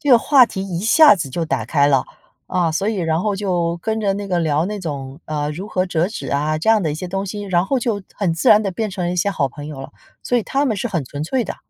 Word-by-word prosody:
这 290 -3 0
个 240 - +8
话 260 -1 +5
题 190 -4 -5
一 175 -1 -3
下 265 +4 +7
子 155 -6 -4
就 165 +4 -2
打 160 - -2
开 145 -3 +2
了。 135 -2 +3 0.4
啊， 175 -3 0
所 195 +6 -1
以 220 - 0
然 165 -2 0
后 205 0 -1
就 175 -4 -1
跟 220 +4 -2
着 200 -2 +1
那 200 0 -5
个 180 -2 0
聊 155 -1 +1
那 205 +1 -4
种， 140 -3 -6
呃， 150 -1 -2
如 185 +8 -6
何 185 -3 0
折 175 0 0
纸 215 - -6
啊 150 +2 0
这 190 +8 +1
样 215 -3 +4
的 155 - 0
一 - - -3
些 180 +4 -5
东 195 +2 -3
西， 205 +2 -5
然 185 -2 0
后 270 - +1
就 220 -4 -2
很 185 -5 0
自 165 - 0
然 210 +1 +7
地 195 - -1
变 215 +3 -3
成 185 -2 -4
了 175 - -1
一 - - -4
些 200 +3 +1
好 140 -7 0
朋 145 +3 -9
友 140 -3 -7
了， 145 - -10 0.3
所 245 - +1
以 - - -2
他 275 +6 0
们 230 -6 0
是 235 +5 -2
很 170 -8 -2
纯 145 +3 -6
粹 245 +8 -1
的。 - - -6
185 Hz, 320 characters per minute, -20 LUFS, 155-210 Hz, 0.4 s, 个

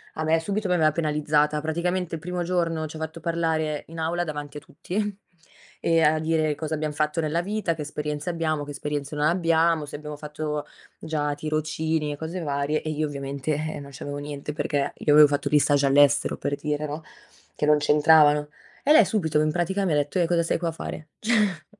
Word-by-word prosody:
a 155 - -2
me 160 +1 +3
subito 200 +5 -2
mi 180 - +2
aveva 155 -3 +4
penalizzata. 150 -1 +1
Praticamente 170 +2 -1
il 160 - -8
primo 180 +1 -3
giorno 170 -2 0
ci 155 - -10
ha - - -8
fatto 160 +1 -5
parlare 160 -2 -1
in 165 0 -9
aula 170 +2 0
davanti 150 -2 -6
a - - -5
tutti 200 +7 -4 0.6
e 165 -1 +2
a 155 0 +4
dire 155 -1 +1
cosa 155 +1 -4
abbiam 155 0 -2
fatto 150 +2 0
nella 160 +2 0
vita, 205 -3 -1
che 155 - -5
esperienze 150 +1 -4
abbiamo, 160 -3 -1
che 145 - -7
esperienze 145 0 -4
non 150 0 +1
abbiamo, 165 -1 +2
se 145 - -7
abbiamo 150 0 -7
fatto 150 0 -4 0.3
già 150 -2 -2
tirocini 155 0 -1
e - - -8
cose 160 +4 -5
varie. 145 0 -1
E 155 - -4
io 155 0 -1
ovviamente, 140 +1 -3
eh, 155 +1 -3
non 140 -1 -10
c'avevo 145 0 -6
niente, 145 0 -5
perché 145 -2 -1
io 145 - +2
avevo 150 0 +9
fatto 145 0 -1
gli 150 - +5
stage 145 -1 +3
all'estero 140 +1 +4
per 145 0 -2
dire 150 +1 -2
no, 150 +2 -6 0.5
che - - -1
non 150 0 +6
c'entravano. 150 0 +5 0.3
E 290 - +3
lei 230 - +7
subito 160 -8 0
in 155 0 +1
pratica 185 +4 0
mi 170 - +1
detto: 145 +5 0
"Eh 175 - +3
cosa 170 0 +2
sei 165 - 0
qua 170 -1 -1
a - - -3
fare?" 155 -1 -7
Cioè 210 -7 +1
155 Hz, 210 wpm, -25 LUFS, 150-165 Hz, 0.6 s, avevo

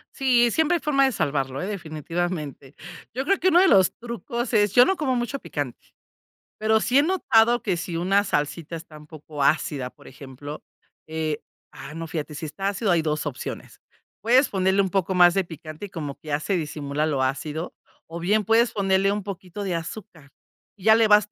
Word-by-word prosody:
Sí, 245 -3 +3
siempre 320 +7 +2
hay 340 - -2
forma 275 -3 +3
de 265 - +2
salvarlo, 135 - -1
¿eh? 185 - -3
Definitivamente. 160 -5 -4 0.4
Yo 260 +3 -2
creo 395 +5 +2
que 375 - +1
uno 350 -1 +6
de 380 - +5
los 190 -2 +5
trucos 235 +1 -5
es 205 -2 +3
yo 245 0 +8
no 385 - +1
como 265 -4 0
mucho 245 +3 -2
picante, 145 - -5 0.8
pero 220 0 +2
sí 255 +5 +3
he - - +6
notado 240 -9 +3
que 190 -5 0
si 170 0 -4
una 195 +4 +2
salsita 160 +1 -2
está 160 -1 -9
un 150 0 -14
poco 150 -2 -7
ácida, 140 -3 +1
por - - -17
ejemplo, 140 +2 -9 0.4
eh 155 -1 -3 0.3
ah, 140 +2 -10
no, 165 0 -5
fíjate, 155 -2 -5
si 155 +2 -5
está 195 +6 -3
ácido 200 +1 -1
hay 170 -2 +3
2 155 -1 -2
opciones. 140 -4 -6 0.4
Puedes 250 +5 +4
ponerle 190 0 +2
un 190 - +2
poco 190 0 0
más 175 -1 +6
de 195 -1 +1
picante 160 +2 -9
y - - -16
como 150 -6 -5
que 155 - -14
ya 145 0 0
se 190 +4 -1
disimula 150 -2 -3
lo 140 -4 0
ácido, 150 +5 -3 0.3
o 165 +1 -7
bien 205 +5 +1
puedes 225 +3 +3
ponerle 195 0 +2
un 205 0 -2
poquito 190 0 -7
de 185 -3 -2
azúcar. 165 -4 -7 0.5
Ya 220 +3 +5
le 225 0 +4
vas 210 0 +5
180 Hz, 200 wpm, -24 LUFS, 155-220 Hz, 0.8 s, yo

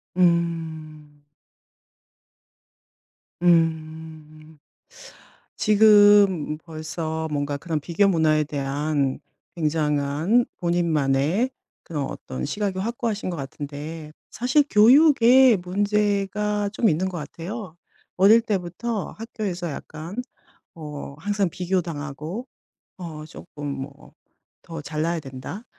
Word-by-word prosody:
음. 160 -4 -1 2.2
음. 160 -2 -1 1.0
지금 205 -6 +5
벌써 160 0 -5
뭔가 145 0 -2
그런 155 +1 -3
비교 175 +7 +1
문화에 155 -4 +3
대한 140 -1 -1 0.4
굉장한 155 +6 +1
본인만의 170 - +1 0.3
그런 150 -4 -3
어떤 65 0 -6
시각이 200 -3 -2
확고하신 225 -2 -2
것 170 - -4
같은데 150 +3 -7 0.2
사실 255 +5 +2
교육에 255 +1 +6
문제가 205 +2 0
좀 225 - +2
있는 185 +4 0
것 180 - -6
같아요. 170 +5 -7 0.4
어릴 215 +5 +6
때부터 205 +1 -3
학교에서 205 -6 -4
약간 155 +5 -8 0.6
어 150 -3 -8
항상 205 +1 0
비교당하고 170 - -3 0.5
어 155 -4 -7
쪼끔 150 -2 -10
뭐 140 +1 -8 0.5
'더 165 -2 -7
잘나야 160 +3 -2
된다.' 135 - -8
165 Hz, 195 characters per minute, -24 LUFS, 150-205 Hz, 2.2 s, 교육에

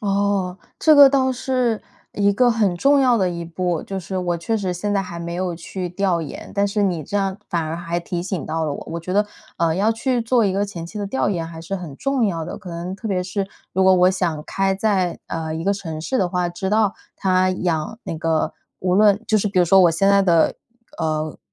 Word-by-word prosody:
哦， 200 -2 0 0.2
这 310 - +6
个 285 -2 +10
倒 260 -1 +2
是 250 -3 0 0.3
一 200 0 +2
个 245 +4 +4
很 210 -6 +1
重 280 +8 +4
要 250 -3 +4
的 185 -4 +1
一 170 -1 -5
步。 170 0 -2
就 195 -1 -5
是 190 +1 -5
我 175 -1 -1
确 220 +7 -1
实 190 -3 -2
现 205 +4 -2
在 200 - +2
还 170 -2 -7
没 170 0 -5
有 180 -1 -2
去 180 +2 -5
调 180 -1 0
研， 155 - -7
但 200 0 +2
是 205 +1 0
你 175 -5 0
这 205 - -3
样 195 -1 0
反 170 -3 0
而 160 +1 -3
还 170 0 -3
提 170 0 -4
醒 180 -4 -3
到 160 +1 -2
了 150 - -1
我。 - - -6
我 170 - -3
觉 180 +3 -5
得， 205 +1 +2 0.3
呃 165 -1 +2
要 215 +4 +2
去 245 +1 0
做 230 0 +2
一 195 - +1
个 200 +1 +1
前 175 -5 -7
期 210 +4 -8
的 200 - -2
调 205 -2 0
研 170 -5 -2
还 165 -1 -9
是 185 +4 -4
很 170 -6 -8
重 275 -5 +1
要 165 -4 -2
的， 175 - -6
可 195 -4 -11
能 175 +3 -5
特 225 - -7
别 185 -3 0
是 195 +2 -3 0.3
如 190 +1 +2
果 190 - +6
我 180 0 +5
想 170 -5 -1
开 195 +2 0
在 190 -3 0
呃 160 -1 -3
一 165 - -4
个 200 - +2
城 165 -6 -5
市 260 +11 -1
的 185 - +2
话， 180 0 0
知 175 +2 -4
道 210 -1 +2 0.2
他 185 -1 +2
养 180 +2 -2
那 - - -5
个 160 -1 0 0.3
无 180 0 +1
论 205 +1 +4
就 220 - +4
是 210 - -1
比 195 -2 0
如 175 - +6
说， 195 +3 +5
我 175 -2 +6
现 195 +4 +2
在 200 0 +5
的 170 -4 +3 0.4
呃 155 -1 -2
185 Hz, 265 characters per minute, -21 LUFS, 170-205 Hz, 0.4 s, 个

